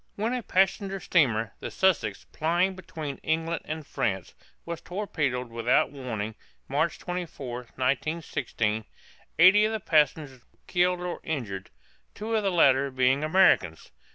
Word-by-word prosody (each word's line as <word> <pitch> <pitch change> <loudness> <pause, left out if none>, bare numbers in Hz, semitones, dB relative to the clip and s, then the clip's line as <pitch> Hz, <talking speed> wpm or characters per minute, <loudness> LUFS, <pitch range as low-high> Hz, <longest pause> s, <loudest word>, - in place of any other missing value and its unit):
When 220 +4 -1
a 250 - -1
passenger 195 -1 +1
steamer, 115 - +2
the - - -5
"Sussex," 170 - +1
plying 175 +4 +1
between 155 -6 -6
England 165 +1 -1
and 155 -1 -5
France, 95 -9 -2 0.3
was 170 -1 -5
torpedoed 145 - -2
without 115 +1 +2
warning 115 -6 -4 0.3
(March 155 +4 0
24, 165 -9 -5 0.2
1916), 130 -5 -1 0.5
eighty 190 +5 +7
of 215 - +2
the 220 - -2
passengers 150 -6 +1
were - - -35
killed 180 0 +1
or 180 -1 -4
injured, 110 -12 -4 0.5
two 220 +2 -3
of 220 - +2
the 200 - +1
latter 140 -6 +4
being 130 +2 +2
Americans. 155 - +3
155 Hz, 135 wpm, -27 LUFS, 125-180 Hz, 0.5 s, eighty